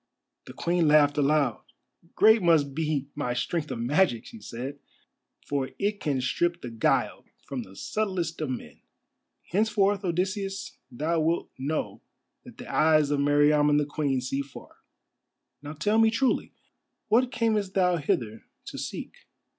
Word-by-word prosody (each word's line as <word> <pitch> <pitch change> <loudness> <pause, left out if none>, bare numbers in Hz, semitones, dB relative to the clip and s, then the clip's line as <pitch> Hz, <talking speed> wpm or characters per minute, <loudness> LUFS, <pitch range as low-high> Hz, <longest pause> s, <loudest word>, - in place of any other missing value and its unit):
The - - -10
Queen 170 -1 +1
laughed 150 -1 +5
aloud. 140 -4 +2 0.5
"Great 220 +1 +6
must 160 -5 +3
be 155 -2 -1
my 125 -4 -2
strength 155 +4 -2
of 130 - -4
magic," 120 +1 +1
she 230 - -12
said, 130 +4 -6 0.7
"for 140 -2 -2
it 205 +1 -1
can 140 -4 -1
strip 175 +6 -1
the 120 - -6
guile 115 -1 0 0.2
from 135 -3 -4
the 95 -4 -12
subtlest 185 - -2
of 155 - -2
men. 120 - -6 0.7
Henceforth, 205 0 +2
Odysseus, 195 +2 -2
thou 155 +7 -1
wilt 165 +2 0
know 150 +4 -3 0.4
that - - -13
the - - -9
eyes 155 -2 +3
of 145 - +1
Meriamun 145 +1 +4
the 150 - +2
Queen 140 -3 -1
see 135 +2 -2
far. 140 -1 -12 0.8
Now 145 +1 -7
tell 205 +9 +1
me 225 0 +6
truly: 250 +4 0 0.6
what 245 +4 +3
camest 215 -5 0
thou 180 -2 +3
hither 115 -7 -2 0.2
to - - -7
seek?" - - -6
155 Hz, 145 wpm, -27 LUFS, 140-190 Hz, 0.8 s, Great